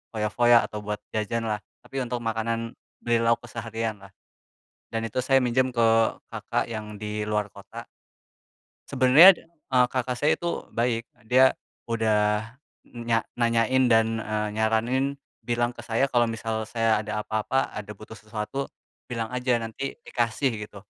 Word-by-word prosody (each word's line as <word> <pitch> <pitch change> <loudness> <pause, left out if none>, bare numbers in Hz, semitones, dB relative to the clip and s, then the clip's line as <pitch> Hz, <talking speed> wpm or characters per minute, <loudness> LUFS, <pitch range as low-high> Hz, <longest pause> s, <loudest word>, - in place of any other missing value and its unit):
foya-foya 115 +3 +4
atau 105 - -6
buat 105 0 -4
jajan 110 +2 -1
lah, 105 - -1 0.3
tapi 135 0 -5
untuk 125 -1 -3
makanan 115 0 -2 0.3
beli 120 -1 +2
lauk 115 0 +2
keseharian 115 -2 -4
lah. 100 -1 -15 0.8
Dan 115 - -2
itu 115 +2 -5
saya 135 +1 +3
minjem 130 +1 +1
ke 115 -1 +4 0.5
kakak - - -2
yang 105 -1 -6
di 105 0 -4
luar 105 -1 -1
kota. 115 +4 -10 1.1
Sebenernya, 140 +8 +8 0.4
eee, 125 - +6
kakak 125 -1 -1
saya 145 +5 +1
itu 170 0 -3
baik. 115 0 0 0.2
Dia 130 +3 +6 0.4
udah 110 0 +1 0.3
e - - -23
e 120 - -6
nya 115 -1 0
nanyain 120 +2 +2
dan 115 0 +3
eee, 105 0 -2
nyaranin 120 +6 +1 0.2
bilang 120 0 -1
ke 120 - -10
saya 120 +3 +1
kalau 120 -3 +2
misal 110 0 -3
saya 115 -2 +2
ada 105 0 -4
apa-apa, 110 +5 -1
ada 105 0 -6
butuh 110 +1 -11
sesuatu, 110 +5 -5 0.4
bilang 115 -2 -2
aja 125 -1 +1
nanti 115 +6 -5
dikasih, 120 +2 0
gitu. 100 -1 -14
115 Hz, 150 wpm, -26 LUFS, 110-125 Hz, 1.1 s, Sebenernya